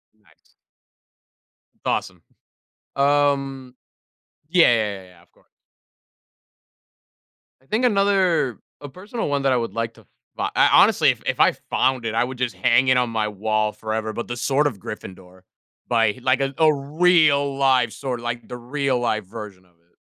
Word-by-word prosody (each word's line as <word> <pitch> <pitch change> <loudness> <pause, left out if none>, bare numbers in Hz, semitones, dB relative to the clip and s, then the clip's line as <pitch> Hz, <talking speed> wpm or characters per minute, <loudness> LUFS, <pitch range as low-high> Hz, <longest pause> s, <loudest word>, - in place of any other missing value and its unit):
Nice. 105 -2 -30 1.3
Awesome. - - -2 0.7
Um 140 -2 0 0.7
Yeah, 180 -1 +5
yeah, 105 -4 -1
yeah, - - -15
yeah, 90 -1 -20
of 90 - -28
course. - - -31 2.1
I - - -29
think 225 - 0
another 195 - +1 0.2
A 145 - -8
personal 200 - -5
one 140 -1 0
that 135 - +2
I 130 - +2
would 115 -4 -3
like 115 0 -3
to - - -19 0.3
bu - - -4
I - - +5
honestly, - - +5
if - - -1
if - - -2
I - - +5 0.2
found 130 -2 0
it, 110 - -2
I 115 - +2
would 130 0 -6
just 125 -2 -2
hang 125 +3 +3
it 130 - +4
on 125 -1 +1
my 110 -2 -1
wall 110 +1 -1
forever, 110 0 -4
but 120 - -5
the 120 0 -5
sword 140 +4 +1
of 120 - -5
Gryffindor, 95 -2 -10 0.5
by 115 -1 +1
like 130 +2 +1
a 135 0 -1
a 160 -1 +5
real-life 140 -5 +2
sword, 125 -1 -5
like, 120 0 -5
the 125 - -7
real-life 120 -4 -2
version 100 -2 -10
of 90 - -29
it. 85 0 -38
125 Hz, 160 wpm, -22 LUFS, 110-140 Hz, 2.1 s, Yeah